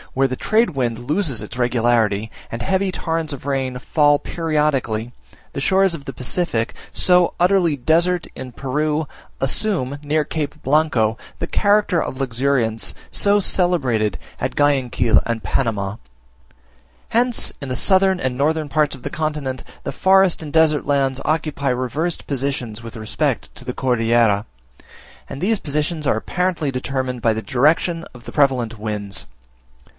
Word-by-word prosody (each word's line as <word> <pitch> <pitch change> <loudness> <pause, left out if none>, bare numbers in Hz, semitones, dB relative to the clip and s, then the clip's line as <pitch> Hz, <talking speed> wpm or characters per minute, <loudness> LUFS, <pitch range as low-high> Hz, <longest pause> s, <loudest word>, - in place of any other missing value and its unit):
where 135 +1 +2
the 130 - -3
trade 220 - +2
wind 120 -5 -1
loses 145 - 0
its - - -8
regularity, 115 -4 +1 0.2
and 115 - -5
heavy 190 0 +1
torrents 165 -3 -2
of 140 -2 -7
rain 135 -2 -1
fall 145 +3 +3
periodically, 145 -8 -1 0.4
the 140 - -3
shores 190 +3 +3
of 160 -4 -5
the 135 - -6
Pacific, 125 -2 -1 0.2
so 180 -1 +4
utterly 175 -4 +3
desert 170 +6 +2
in 130 -1 -7
Peru, 150 +4 -1 0.3
assume 140 -1 +1
near 150 +1 +1
Cape 150 0 -4
Blanco 130 -7 +2 0.2
the 165 - -2
character 205 -4 +2
of 130 - -5
luxuriance 125 -3 0 0.2
so 205 0 +4
celebrated 135 - +1 0.2
at - - -2
Guyaquil 130 -6 +3
and 115 -2 -2
Panama. 105 -6 -1 1.1
Hence 240 +1 +1
in 140 - -5
the 130 - -2
southern 190 - +3
and 130 -4 -1
northern 155 +3 0
parts 150 -1 +1
of 130 - -15
the - - -3
continent, 150 -4 -3 0.2
the - - -4
forest 190 -2 +4
and 150 -2 -7
desert 155 -2 +3
lands 135 -2 +1
occupy 155 -2 -1
reversed 130 +7 -2
positions 130 -5 -3
with 115 0 -8
respect 110 -1 -2
to - - -10
the - - -4
Cordillera, 115 -4 +2 0.8
and - - -6
these 210 +4 +1
positions 150 +2 -2
are 110 - +2
apparently 175 +3 -1
determined 130 -1 -3
by 115 - +3
the 110 0 -4
direction 160 +5 +2
of 120 - -13
the - - -7
prevalent 125 -6 +2
winds. 105 -2 -4
140 Hz, 150 wpm, -20 LUFS, 120-165 Hz, 1.1 s, so